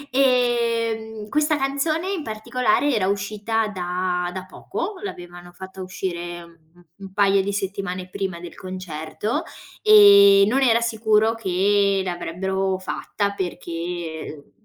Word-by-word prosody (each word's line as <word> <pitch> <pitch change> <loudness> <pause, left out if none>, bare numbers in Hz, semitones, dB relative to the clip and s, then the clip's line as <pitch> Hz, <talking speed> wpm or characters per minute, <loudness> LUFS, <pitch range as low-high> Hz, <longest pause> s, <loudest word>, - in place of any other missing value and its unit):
Ehm, 230 -4 +1
questa 300 +2 +2
canzone 310 +6 -1
in 380 -4 -2
particolare 240 +4 0
era 205 -5 +1
uscita 210 +2 -1
da 180 -1 -2
da 185 0 -6
poco. 415 - -5
L'avevano 175 - -8
fatta 190 +1 -10
uscire 175 -2 -5
un 170 -1 -18 0.4
un 195 - -9
paio 200 -1 +3
di 200 +1 -2
settimane 195 -2 -4
prima 185 -2 -4
del 175 -1 -10
concerto, 185 +2 -4 0.4
ehm, 200 -1 +8
non 260 +6 +2
era 235 -3 +4
sicuro 220 -1 +2
che 200 -1 +2
l'avrebbero 190 +2 -2
fatta 200 +2 -3
perché 170 -4 -5
200 Hz, 120 wpm, -22 LUFS, 180-225 Hz, 0.4 s, ehm